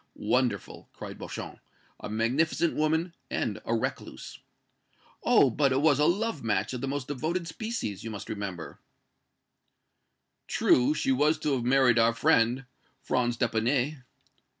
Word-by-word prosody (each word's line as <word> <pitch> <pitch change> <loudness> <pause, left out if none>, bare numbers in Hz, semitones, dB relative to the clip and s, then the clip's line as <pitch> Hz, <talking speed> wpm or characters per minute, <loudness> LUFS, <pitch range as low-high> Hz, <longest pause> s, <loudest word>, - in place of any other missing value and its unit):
"Wonderful!" 125 -7 -1
cried - - -9
Beauchamp. - - -7 0.4
"A - - -7
magnificent 130 +10 +1
woman 160 +3 0 0.2
and - - -2
a - - 0
recluse!" - - -5 0.8
"Oh! 215 - +4
but 140 +3 +2
it 130 - +2
was 150 -3 +4
a 150 - +4
love 200 - 0
match 105 0 0
of 125 - -4
the 135 - -2
most 140 -1 -3
devoted 160 +5 -2
species, 215 - -4
you 115 - -5
must 105 -2 -7
remember." 100 -6 -6 1.7
"True; 130 +5 +3
she 135 - 0
was 150 +4 +3
to 150 - 0
have 125 -3 -1
married 125 -2 +4
our 115 0 +4
friend, 115 +3 +2 0.3
Franz 120 -2 0
d'Epinay." 125 +5 0
130 Hz, 140 wpm, -28 LUFS, 115-155 Hz, 1.7 s, Oh